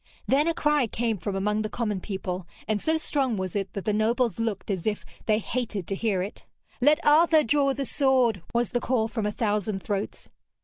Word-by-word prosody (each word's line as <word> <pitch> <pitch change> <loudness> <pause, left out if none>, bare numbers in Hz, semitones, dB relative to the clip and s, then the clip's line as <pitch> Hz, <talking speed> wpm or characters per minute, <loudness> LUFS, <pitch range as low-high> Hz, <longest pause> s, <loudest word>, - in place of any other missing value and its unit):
Then 290 +4 +3
a 335 - +1
cry 295 -4 +2
came 225 -2 -1
from 195 +4 -3
among 210 +2 0
the 215 - -3
common 210 -4 -2
people, 185 -3 -4 0.2
and 215 -2 0
so 320 0 +1
strong 270 -7 0
was 185 -1 -3
it 195 -1 -2
that 200 - -5
the 210 - +1
nobles 230 +2 +1
looked 220 -3 -2
as 190 0 -2
if 210 -1 -1 0.2
they 215 -1 +4
hated 225 -4 -3
to 195 - -2
hear 195 -3 0
it. 200 - -7 0.4
'Let 300 +5 +4
Arthur 315 +1 +6
draw 280 +2 +3
the 275 +1 -2
sword!' 255 - +2
was 235 -1 +1
the 245 - 0
call 240 -2 +1
from 220 -2 -2
a - - -1
thousand 210 -2 -1
throats. 205 -1 -3
220 Hz, 210 wpm, -26 LUFS, 205-260 Hz, 0.4 s, Arthur